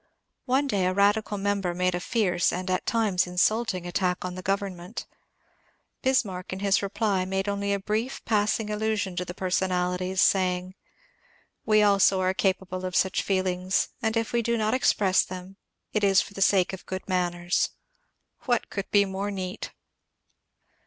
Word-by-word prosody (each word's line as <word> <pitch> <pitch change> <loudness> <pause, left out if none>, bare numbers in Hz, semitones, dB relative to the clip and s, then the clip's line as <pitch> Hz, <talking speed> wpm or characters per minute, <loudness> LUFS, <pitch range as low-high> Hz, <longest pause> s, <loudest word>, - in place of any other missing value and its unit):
One 265 +2 +2
day 200 -9 +1
a 185 - +1
radical 205 +1 +2
member 195 -3 -1
made 180 0 +1
a 175 - -1
fierce 180 -3 +1
and 185 +1 -3
at 185 - -1
times 210 -6 +1
insulting 185 +1 +1
attack 180 0 -1
on 180 - -4
the 185 - -7
government. 195 0 -3 1.0
Bis 260 -3 +3
marck 185 -2 -7
in 185 - -3
his 200 +1 +2
reply 200 -1 0
made 195 +1 -2
only 200 0 -1
a 200 - +1
brief 220 +6 -3
passing 210 0 +1
allusion 210 -3 -1
to 180 - -1
the 175 - -7
personalities, 185 0 -1
sa3ring, 185 -2 +3
^^ 185 - -13 0.9
We 215 -1 +5
also 200 -1 +4
are 185 0 +1
capable 185 -1 -1
of 185 -1 -4
such 190 0 +2
feelings, 185 -1 0
and 220 -1 0
if 230 +1 -2
we 235 - +2
do 235 0 0
not 215 0 0
express 200 -7 +3
them 185 +1 -9 0.4
it 215 - 0
is 195 -2 +5
for - - -3
the 195 - -7
sake 195 -1 +3
of 190 - -9
good 185 0 -5
man 180 -2 0
ners." 175 0 0 0.8
What 240 -3 0
could 200 - -4
be 200 -1 +4
more 195 +1 -3
neat 190 0 -5
195 Hz, 175 wpm, -26 LUFS, 185-210 Hz, 1.0 s, We